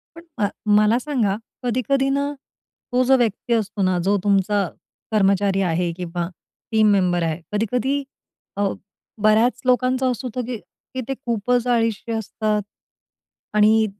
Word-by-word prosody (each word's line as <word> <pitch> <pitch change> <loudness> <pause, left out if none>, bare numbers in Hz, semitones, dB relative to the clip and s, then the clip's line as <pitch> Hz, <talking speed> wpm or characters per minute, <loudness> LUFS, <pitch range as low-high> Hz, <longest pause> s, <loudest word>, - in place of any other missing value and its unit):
पण 335 - -11 0.2
अ, 200 - +2 0.3
मला 215 +3 +4
सांगा. 245 -9 0 0.3
कधी-कधी 255 +3 +1
ना, 280 +1 0 0.6
तो 250 - +3
जो 265 +1 +5
व्यक्ती 235 0 -1
असतो 215 -2 -1
ना, 185 -1 +2
जो 195 +4 +2
तुमचा 200 0 +2 0.5
कर्मचारी 195 -1 +3
आहे 175 0 0
किंवा 175 -1 -3 0.4
टीम 220 -1 +4
मेंबर 180 -3 +2
आहे. 165 0 -1
कधी-कधी 250 +6 0 0.5
अ, 205 - +1 0.6
बऱ्याच 220 +3 +4
लोकांचं 255 +1 +2
असं 250 +1 -4
होतं 250 +1 -3
की 245 -1 -3 0.4
की 260 - -2
ते 270 - -1
खूपच 245 -1 -1
अळीशी 230 -1 0
असतात 215 -1 -1 0.9
आणि 215 +1 +5
220 Hz, 135 wpm, -22 LUFS, 200-250 Hz, 0.9 s, जो